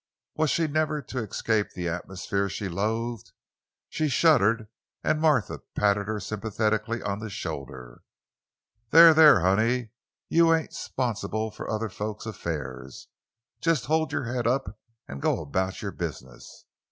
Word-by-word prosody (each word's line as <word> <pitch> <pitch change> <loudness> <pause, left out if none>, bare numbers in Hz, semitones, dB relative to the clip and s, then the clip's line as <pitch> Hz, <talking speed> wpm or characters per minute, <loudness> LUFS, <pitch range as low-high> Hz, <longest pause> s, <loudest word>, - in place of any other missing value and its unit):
Was 155 -1 +1
she 165 - +1
never 155 0 0
to 125 - -5
escape 110 -1 -1
the 90 -1 -3
atmosphere 95 +3 -3
she 100 - -4
loathed? 110 +4 -3 0.5
She 155 - -1
shuddered 115 -7 +3 0.4
and 155 0 +1
Martha 150 - +2 0.2
patted 100 -1 +2
her 110 -1 -2
sympathetically 110 +2 -2
on 100 0 -2
the 110 0 -6
shoulder. 65 -9 -7 0.9
"There, 165 +3 +9
there, 150 - +7
honey; 110 +6 +1 0.4
you 165 0 +5
ain't 160 - -4
'sponsible 110 -3 -3
for - - -8
other 110 0 -2
folks' 105 +3 -5
affairs. 70 - -6 0.5
Jes' 165 -5 +2
you - - -10
hold 160 0 +1
you' - - -1
head 120 0 -2
up 130 -2 -1 0.3
an' 70 - -7
go - - +1
about 95 +7 -2
you' 100 - -3
business. 65 -8 -8
110 Hz, 140 wpm, -26 LUFS, 95-130 Hz, 0.9 s, There